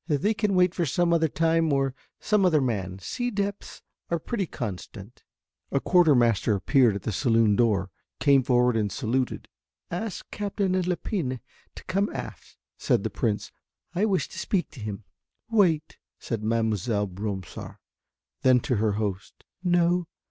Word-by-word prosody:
"They 160 +7 +1
can 210 -2 0
wait 180 -1 +4
for 175 - -1
some 170 +3 +1
other 165 -1 +3
time 165 +1 +1
or 135 -1 +1 0.3
some 210 -2 +2
other 170 -5 +4
man, 100 -8 -2
sea 245 - -3
depths 200 -2 -4 0.3
are 170 - +1
pretty 195 +3 -3
constant." 105 -2 -7 0.5
A 140 - +2
quarter 175 -2 +4
master 115 -3 +3
appeared 120 +2 +3
at 100 - -5
the - - -2
saloon 115 -1 +3
door, 100 -5 +1 0.3
came 140 -2 +5
forward 125 -2 +3
and 105 -3 0
saluted. 125 +3 -2 0.4
"Ask 185 +4 -5
Captain 200 -2 -1
Lepine 180 - -1 0.4
to - - -10
come 195 +2 0
aft," - - -8 0.2
said - - +1
the - - -2
Prince. - - -2 0.4
"I 190 +4 +1
wish 195 -4 +1
to - - -8
speak 190 -4 -1
to 135 - -12
him." 105 -1 -5 0.5
"Wait," 170 -8 +2 0.2
said 115 -3 -4
Mademoiselle 110 -1 0
Bromsart. 95 -1 -6 0.7
Then 130 -1 +5
to 125 -2 0
her 105 0 +1
host. 100 -2 -4 0.2
"No. 175 -1 +2
135 Hz, 155 wpm, -26 LUFS, 110-180 Hz, 0.7 s, came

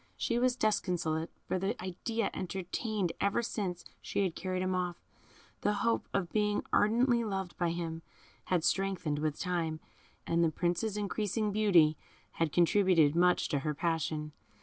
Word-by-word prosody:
She 235 0 0
was 250 0 +2
disconsolate; 175 -8 0 0.2
for 185 - 0
the 200 +6 -2
idea, 200 +5 -2
entertained 190 +1 -2
ever 200 +4 +1
since 190 -6 -3 0.2
she 200 - -1
had 185 -4 0
carried 185 0 -2
him 185 0 0
off, 180 -1 -2 0.6
the 205 - +2
hope 230 - +1
of 180 -3 -1
being 210 -1 +1
ardently 235 +3 +3
loved 195 -4 -3
by 175 -1 +2
him, 165 -1 -3 0.4
had 180 -3 +1
strengthened 170 -4 0
with 150 -1 -1
time, 165 -3 -1 0.5
and 170 0 +2
the 165 - +4
Prince's 175 +6 -1
increasing 210 +1 -1
beauty 180 -8 +4 0.3
had 165 -2 -1
contributed 170 -3 +4
much 180 +1 +3
to 145 - +1
her 150 +2 -2
passion. 155 -1 -1
185 Hz, 150 wpm, -32 LUFS, 165-210 Hz, 0.6 s, the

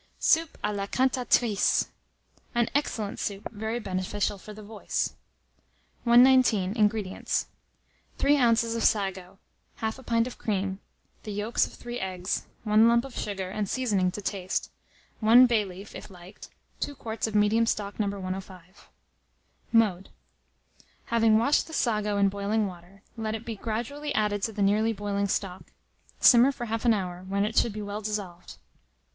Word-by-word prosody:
SOUP 325 -1 +2
A 210 - 0
LA 200 -1 -3
CANTATRICE. 250 -4 +2 0.6
(An 240 -1 +2
Excellent 225 -8 -2
Soup, 200 0 -3
very 220 +1 -3
Beneficial 195 0 -2
for 215 - -11
the 210 0 -10
Voice.) 210 0 -3 0.9
119. 240 -5 +5
INGREDIENTS. 210 -3 0 0.7
3 285 +1 +3
oz. 230 -1 +3
of 230 - -1
sago, 190 -3 0 0.4
1/2 220 +4 -3
pint 230 -1 +1
of 250 - -8
cream, 195 -3 -2 0.4
the 215 - -7
yolks 210 +3 0
of - - -15
3 240 0 -6
eggs, 185 0 -3 0.2
1 215 +1 +5
lump 235 +2 +3
of 270 - -10
sugar, 190 -3 -4
and 205 -1 -3
seasoning 205 -8 +1
to 200 +3 -7
taste, 185 -1 -3 0.5
1 235 +3 +7
bay 235 -4 +2
leaf 195 +1 -10
(if - - -9
liked), 180 0 -13 0.3
2 285 - -3
quarts 225 -3 -3
of 215 - -5
medium 215 +2 +3
stock 205 -2 -2
No. 210 - +1
105. 190 -1 -7 0.8
Mode. 205 -5 +2 1.0
Having 225 -2 +5
washed 280 +6 +2
the 320 - -10
sago 210 -6 0
in 200 0 +4
boiling 200 +2 0
water, 185 +1 -10
let 220 -1 -3
it 225 +1 -7
be 230 - -4
gradually 245 +8 -4
added 210 -1 +1
to 225 - -1
the 205 -2 -1
nearly 215 +3 +2
boiling 200 -1 -2
stock. 190 -1 -3 0.5
Simmer 245 +2 +7
for 265 -3 -6
1/2 225 +1 -3
an 235 - +6
hour, 180 -2 -4
when 200 +1 +1
it 220 +1 -4
should 235 - +3
be 210 0 -6
well 205 +1 -5
dissolved. 200 -5 -5
210 Hz, 155 wpm, -27 LUFS, 195-230 Hz, 1.0 s, 1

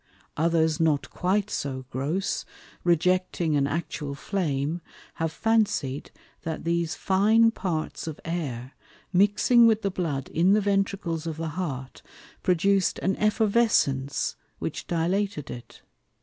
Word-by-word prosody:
Others 160 -1 +2
not 155 -3 +1
quite 200 +3 0
so 130 -2 -3
gross, 155 +10 -1 0.4
rejecting 175 -1 +2
an 140 -1 +2
Actual 150 -2 -3
Flame, 155 -2 -2 0.4
have 165 -1 0
fancied, 200 -10 0 0.3
that 160 -1 -4
these 170 -1 0
fine 220 +4 +4
Parts 165 -7 -3
of 155 - -5
Air 135 -7 -3 0.4
mixing 205 +5 +5
with 220 -1 +2
the 195 - 0
Blood 150 -8 -2
in 175 +5 +3
the 210 - +4
Ventricles 195 -5 -1
of 160 -2 -4
the 165 0 -3
Heart, 145 -6 -5 0.4
produc'd 190 +1 +2
an 190 - +2
Effervescence 215 - +2 0.2
which - - -5
dilated 175 -1 -1
it. 120 - -10
170 Hz, 120 wpm, -26 LUFS, 150-195 Hz, 0.4 s, mixing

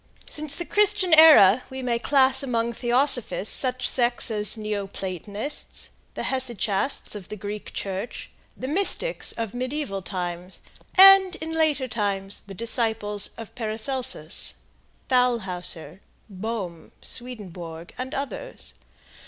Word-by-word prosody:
Since 300 -2 -2
the 345 - -3
Christian 410 -3 +3
era 260 -9 +8
we 265 0 -6
may 235 -2 0
class 265 0 +4
among 235 -3 -1
theosophists 245 -3 +1
such 255 -1 -1
sects 240 -2 +1
as 210 0 +1
Neo 210 -2 -3
Platonists, 200 - -4 0.2
the - - -4
Hesychasts 245 -2 0
of 205 -4 -8
the - - -5
Greek 210 +1 -7
Church, 195 +3 -6 0.3
the 260 - -5
Mystics 395 - +1
of 225 -3 -5
mediaeval 255 -4 -3
times, 180 -1 -6 0.4
and, 385 -1 +8
in 320 -2 -6
later 310 -5 +1
times, 200 -4 -3
the 195 - -9
disciples 220 -2 0
of 225 -2 -9
Paracelsus, 225 - 0 0.5
Thalhauser, 195 -9 -1 0.3
Bohme, 190 -4 -5
Swedenborg 180 -9 -6
and 255 +1 -6
others. 285 - -6
235 Hz, 120 wpm, -24 LUFS, 200-265 Hz, 0.5 s, era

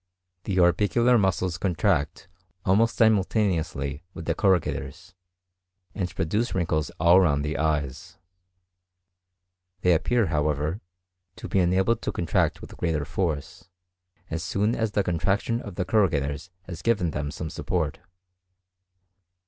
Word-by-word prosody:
The 95 - -2
orbicular 110 +7 +4
muscles 95 -3 0
contract 90 -3 0 0.4
almost 110 +5 +3
simultaneously 90 - +1
with 80 - -7
the 85 - +1
corrugators, 90 -3 -1 0.8
and 90 -3 -4
produce 105 +9 -1
wrinkles 80 -5 0
all 85 +3 +6
round 70 -5 +2
the 75 +1 -2
eyes; 75 +4 -2 1.6
they 90 - +4
appear, 115 +7 +2
however, 75 +3 -1 0.5
to 115 +1 -8
be 95 - +1
enabled 95 +6 +2
to - - -2
contract 85 - 0
with - - -11
greater 80 -4 -1
force, 80 +2 -3 0.6
as 80 0 -2
soon 100 +7 0
as 110 -2 -1
the 100 - +2
contraction 95 +7 0
of 100 -4 -9
the 90 - -2
corrugators 80 -6 0
has 85 -3 -8
given 100 -8 +1
them 75 -1 -3
some 80 +1 -6
support. - - -2
90 Hz, 125 wpm, -25 LUFS, 80-100 Hz, 1.6 s, all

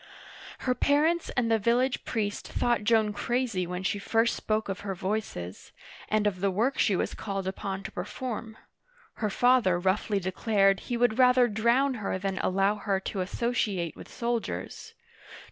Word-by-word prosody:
Her 255 - +1
parents 310 +6 +2
and 230 -2 +2
the 225 - +4
village 245 +4 +1
priest 205 -3 -2
thought 240 -3 0
Joan 220 -1 +3
crazy 230 -5 -1
when 180 +1 -4
she 200 +1 -1
first 225 +3 +1
spoke 215 0 -1
of 195 0 -3
her 195 -2 -4
voices, 185 - -4 0.4
and 215 0 +2
of 190 -3 0
the 200 - +2
work 230 +8 0
she 205 - +3
was - - -1
called 195 -3 -4
upon 195 0 -4
to - - -6
perform. 220 +3 -5 0.6
Her 215 - -1
father 245 -5 +3
roughly 195 +3 0
declared 195 +1 +2
he 240 - 0
would 240 0 +2
rather 250 -1 +6
drown 235 +6 +2
her 195 - -1
than 195 0 -3
allow 195 +3 +1
her 200 -2 -1
to 195 0 -3
associate 195 -4 -1
with - - -11
soldiers. 235 -1 -4
210 Hz, 160 wpm, -28 LUFS, 195-240 Hz, 0.6 s, rather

